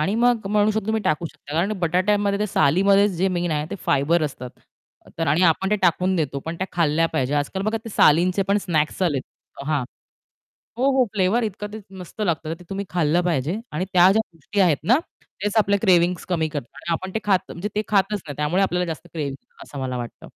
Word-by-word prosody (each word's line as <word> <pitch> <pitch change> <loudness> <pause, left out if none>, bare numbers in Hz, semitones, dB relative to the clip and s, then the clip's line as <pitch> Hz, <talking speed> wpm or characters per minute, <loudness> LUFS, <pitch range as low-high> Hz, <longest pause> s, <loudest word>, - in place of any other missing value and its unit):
आणि 190 +7 0
मग 235 -3 +2
म्हणू 210 +1 +2
शकतो 215 -1 -2
तुम्ही 220 -1 0
टाकू 165 +2 0
शकता. 150 -2 -12
कारण 180 +7 +1
बटाट्यामध्ये 200 +4 +1
ते 210 - +1
सालीमध्ये 195 +5 +4
जे 190 0 0
मेन 175 -1 -1
आहे, 150 0 -1
ते - - -3
फायबर 155 +4 +2
असतात. 130 -4 -4 0.7
तर 165 - 0
आणि 155 +6 +2
आपण 180 +3 +3
ते 210 - +3
टाकून 180 +2 +2
देतो 140 -3 -1
पण 165 +1 -4
त्या 190 - -2
खाल्ल्या 165 -1 +2
पाहिजे. 135 +2 0
आज-काल 145 +7 -1
बघा 215 +2 0
ते - - -6
सालींचे 180 +5 +4
पण 200 +1 +3
स्नॅक्स 160 -1 -1
आलेत. 145 -7 +1 0.4
हां. 150 -5 0 0.9
हो, 265 +2 +3
हो. 255 - +5
फ्लेवर 205 +4 +2
इतकं 210 0 -4
ते 220 - -6 0.2
मस्त 180 +4 -9
लागतं 160 -4 -1
ते - - -13
तुम्ही 195 +1 -4
खाल्लं 170 0 +2
पाहिजे 165 +2 0
आणि 175 +5 -2
त्या 180 +1 +7
ज्या 220 +3 +3
गोष्टी 165 +6 -5
आहेत 170 -6 +4
ना 245 +7 +4 0.4
तेच 210 +1 -1
आपल्या 200 -1 +3
क्रेविंग 180 -3 +4 0.2
कमी 160 -3 +1
करतात. 145 -5 -5
आणि 170 - -6
आपण 190 +3 -4
ते - - +1
खात 195 -3 +3
म्हणजे 200 +5 -5
ते 210 - +2
खातच 200 -1 +1
नाही 145 - -6
त्यामुळे 150 +6 +1
आपल्याला 180 -1 0
जास्त 165 +1 -6
क्रेविंग 145 -4 -3 0.3
असं 140 - -9
मला 130 -1 -3
वाटतं. 120 -1 -7
180 Hz, 210 wpm, -23 LUFS, 155-200 Hz, 0.9 s, त्या